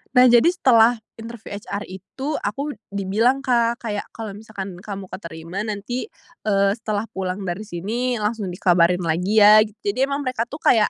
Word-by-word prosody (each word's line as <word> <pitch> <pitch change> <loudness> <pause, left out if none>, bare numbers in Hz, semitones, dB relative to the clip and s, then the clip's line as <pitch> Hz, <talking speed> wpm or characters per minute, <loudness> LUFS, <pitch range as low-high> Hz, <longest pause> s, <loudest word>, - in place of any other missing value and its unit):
Nah, 250 0 +8
jadi 240 +5 +6
setelah 245 -9 +4 0.2
interview 230 -2 -9
HR 200 0 -5
itu 265 - -6
aku 280 +9 -3 0.2
dibilang, 215 +7 +1
Kak, 235 -2 +2
kayak, 210 -4 -4
"Kalau 220 -3 -7
misalkan 200 -2 -7
kamu 200 -1 -6
keterima 170 0 -7
nanti, 215 - -4 0.4
eee, 195 -1 +3
setelah 215 -1 -3
pulang 185 -1 -3
dari 180 +2 -3
sini 220 +6 -2
langsung 210 -2 -2
dikabarin 180 0 +2
lagi, 180 +6 0
ya". 210 0 +9
Jadi 215 +4 -1
emang 280 0 -2
mereka 245 -2 -2
tuh 290 - -6
kayak 225 -8 +4
215 Hz, 160 wpm, -22 LUFS, 195-240 Hz, 0.4 s, ya